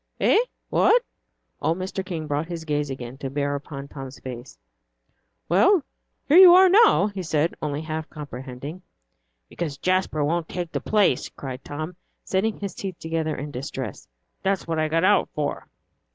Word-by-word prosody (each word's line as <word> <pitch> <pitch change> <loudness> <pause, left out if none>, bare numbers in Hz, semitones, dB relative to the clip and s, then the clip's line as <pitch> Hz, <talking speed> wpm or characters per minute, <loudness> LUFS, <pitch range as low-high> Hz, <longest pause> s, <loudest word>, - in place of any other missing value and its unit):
"Eh! - - +4 0.3
what?" 485 +1 +4 0.6
Old 165 +2 +1
Mr. 190 +1 -4
King 170 -4 -5
brought 150 +2 -2
his 170 -2 -6
gaze 150 -2 -1
again 130 -1 -7
to 135 - -4
bear 145 +1 -1
upon 140 -1 -6
Tom's 135 -2 -9
face. 125 0 -8 0.9
"Well, 330 - +4 0.4
you 355 +4 +9
are 375 - +8
here 380 - +6 0.2
now," 200 - +4
he 195 - -4
said, 160 -1 0
only 150 -1 -2
half 160 0 -5
comprehending. 140 +3 -8 0.7
"Because 150 - -4
Jasper 185 -3 +1
won't 165 +2 -1
take 175 -2 -4
the - - -2
place," 205 -11 +2
cried 130 -1 -8
Tom, 155 +4 -6 0.3
setting 205 +3 0
his 200 -2 -4
teeth 190 -3 -6
together 160 -1 -2
in 145 +2 -6
distress. 130 +1 -6 0.3
"That's 195 0 0
what 165 -1 -1
I 155 - +2
got 165 +2 +1
out 205 +2 +4
for." 150 -1 -3
160 Hz, 165 wpm, -24 LUFS, 145-185 Hz, 0.9 s, you